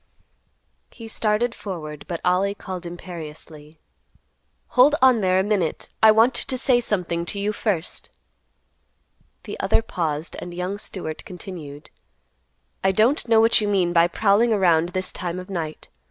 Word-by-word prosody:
He 230 -2 -11
started 220 +2 0
forward, 155 -9 -7
but 170 -2 -4
Ollie 190 +3 +2
called 185 -3 -7
imperiously, 160 -3 -9 0.9
"Hold 275 +4 +5
on 255 -4 +5
there 185 -1 +3
a - - +2
minute, 195 -6 -1
I 220 - +8
want 225 +4 +4
to 260 +1 -2
say 250 -1 +3
something 180 -6 -1
to 200 - -3
you 205 +1 -1
first." 195 -6 -3 1.3
The - - -7
other 225 - +2
paused, 160 -6 -3
and 175 0 -8
young 185 +3 -3
Stewart 160 -7 -6
continued; 160 -6 -9 0.9
"I 190 - +4
don't 230 - +2
know 225 -1 +5
what 225 0 +5
you 210 - 0
mean 185 -4 +1
by 170 0 +5
prowling 210 +5 +2
around 175 -5 +3
this 185 0 -1
time 175 -1 -4
of 185 +1 -8
night. 160 -4 -5
185 Hz, 150 wpm, -23 LUFS, 170-215 Hz, 1.3 s, I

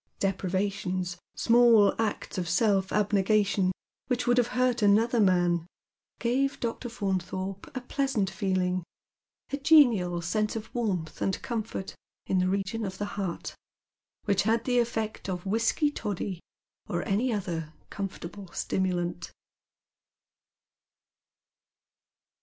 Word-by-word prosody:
Deprivations, 185 -1 -1 0.2
small 230 -3 +5
acta 210 -3 -2
of 175 - -4
self 195 +1 +2
abnegation 200 -2 +2 0.4
which 250 -1 0
would 245 0 +4
have 240 - +3
hurt 250 -2 +2
another 220 +4 +4
man, 175 -4 +3 0.5
gave 270 +3 0
Dr. 240 +1 -3
Faimthorpe 190 -3 -3
a - - -3
pleasant 265 -5 0
feeling, 185 -2 0 0.7
a 280 - -1
genial 245 - +5
sense 210 +6 -1
of 220 0 -6
warmth 185 -10 -2
and 190 - 0
comfort 220 -4 -4 0.3
in 190 - +1
the 185 0 +2
region 195 +3 -1
of 190 -2 -4
the 205 - -2
heart, 190 -4 -4 0.7
which 200 -1 +3
had 225 +2 +1
the 245 -1 +3
effect 225 -3 -2
of 180 0 -4
whisky 230 +8 +1
toddy 200 -7 -4 0.5
or 175 0 -2
any 225 +6 +1
other 170 -7 -3 0.2
comfortable 195 -1 -6
stimulant. 175 -2 -1
200 Hz, 115 wpm, -28 LUFS, 185-230 Hz, 0.7 s, small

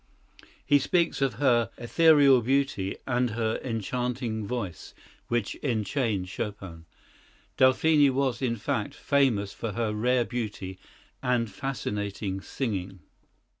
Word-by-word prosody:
He 145 +1 +5
speaks 170 +2 +1
of 135 -2 +1
her 120 -6 +2
"ethereal 140 0 +5
beauty" 130 -6 0
and 125 0 +1
her 110 0 -1
"enchanting 120 -1 -2
voice" 100 -8 -5 0.3
which 120 -3 -1
enchained 110 -5 -1
Chopin. 95 -4 -6 0.7
Delphine 145 +3 +5
was, 130 -2 0
in 120 -3 0
fact, 110 -1 -3
"famous 120 -9 +1
for 115 -3 -5
her 115 -1 -1
rare 120 +3 +2
beauty 105 -6 -5 0.4
and 120 -3 0
fascinating 100 -5 -3
singing." 95 -8 -4
120 Hz, 110 wpm, -27 LUFS, 105-130 Hz, 0.7 s, He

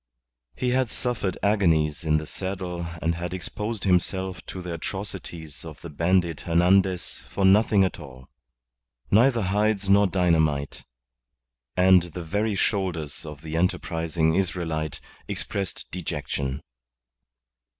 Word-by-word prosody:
He 125 - -1
had 130 -1 +2
suffered 110 -6 -2
agonies 80 -7 +2
in 75 -1 +3
the 80 - -3
saddle 90 -1 -4 0.2
and 85 +1 +2
had 85 +1 -4
exposed 105 +4 -4
himself 95 -1 0
to 95 - -6
the 90 -1 -5
atrocities 85 -3 -6
of 80 -3 -9
the 85 - -8
bandit 85 +1 +1
Hernandez 90 +2 +2
for 100 - 0
nothing 100 +1 +5
at 95 - -1
all. 65 -4 -11 0.8
Neither 115 +2 +5
hides 100 +1 +1
nor 100 0 +6
dynamite 80 -6 +1 0.9
and 90 0 +7
the 85 0 -7
very 105 +5 0
shoulders 90 -8 -1
of 75 -1 -8
the 80 0 -5
enterprising 80 -2 +1
Israelite 85 -4 -1 0.3
expressed 100 -2 -3
dejection. 75 -5 -3
90 Hz, 120 wpm, -25 LUFS, 80-95 Hz, 0.9 s, and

